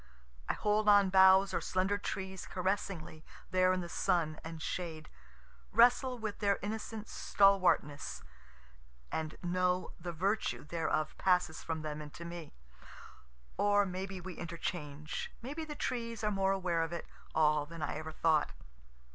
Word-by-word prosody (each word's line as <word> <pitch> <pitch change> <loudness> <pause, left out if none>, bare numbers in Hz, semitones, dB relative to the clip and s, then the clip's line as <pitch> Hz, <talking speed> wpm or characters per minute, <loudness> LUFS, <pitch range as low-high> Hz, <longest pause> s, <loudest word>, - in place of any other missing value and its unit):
I - - +3
hold 210 0 +2
on 200 -2 +6
boughs 190 +1 +7
or - - 0
slender 190 +2 0
trees 190 -2 -5
caressingly 180 -4 -3 0.3
there 185 0 +4
in 185 0 0
the 175 - -5
sun 160 -2 0
and 160 0 -7
shade, 160 -2 -4 0.6
wrestle 245 +3 +5
with 215 -3 -4
their 200 -1 +2
innocent 220 +1 -4
stalwartness 185 -7 +2 0.9
and 155 -1 -3
know 180 +1 +1
the 175 +1 -4
virtue 195 +6 -1
thereof 155 -1 -1
passes 180 -4 +2
from 160 -1 -4
them 150 0 -4
into 150 +3 -9
me. 170 - -8 1.0
(Or 205 0 +4
may 185 +1 -4
be 190 -1 -6
we 185 +1 -7
interchange 160 -3 -4
may 265 +4 -4
be 320 +1 -4
the 300 -1 -6
trees 230 -4 -3
are 210 - +2
more 195 -1 +2
aware 180 -4 0
of 165 - -2
it 170 - -4 0.3
all 150 -1 +3
than 165 -1 -7
I - - -2
ever 155 +1 -6
thought.) 155 - +2
185 Hz, 150 wpm, -33 LUFS, 160-200 Hz, 1.0 s, boughs